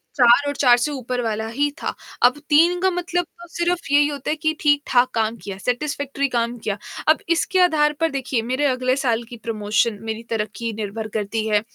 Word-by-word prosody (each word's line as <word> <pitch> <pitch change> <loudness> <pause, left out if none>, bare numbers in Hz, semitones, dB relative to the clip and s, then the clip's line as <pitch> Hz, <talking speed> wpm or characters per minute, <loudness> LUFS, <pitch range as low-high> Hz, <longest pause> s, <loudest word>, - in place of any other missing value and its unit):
4 250 +2 +5
और 285 - -2
4 245 -4 +5
से 270 +5 -1
ऊपर 255 -2 -3
वाला 220 -1 -2
ही 280 +6 0
था। - - -2 0.3
अब 250 +3 +5
3 335 +4 +5
का 380 - +4
मतलब 355 0 -1 0.2
तो 345 - -11
सिर्फ 345 -2 -2
यही 290 0 +5
होता 285 -3 -5
है 305 - +1
कि 315 0 0
ठीक-ठाक 285 -4 +3
काम 225 0 0
किया, 195 -2 -6
सैटिस्फैक्टरी 280 +4 -2
काम 235 -1 -1
किया, 210 -3 -3 0.3
अब 310 - +6
इसके 345 +3 +1
आधार 305 -4 +3
पर 325 0 +2
देखिए 270 -2 -1
मेरे 260 +3 +1
अगले 255 -1 +1
साल 240 -4 0
की 240 - -9
प्रमोशन 215 -1 0
मेरी 220 0 -4
तरक्की 225 +1 -3
निर्भर 215 +1 -4
करती 215 +1 -2
है। 210 -1 +2
255 Hz, 200 wpm, -22 LUFS, 225-295 Hz, 0.3 s, अब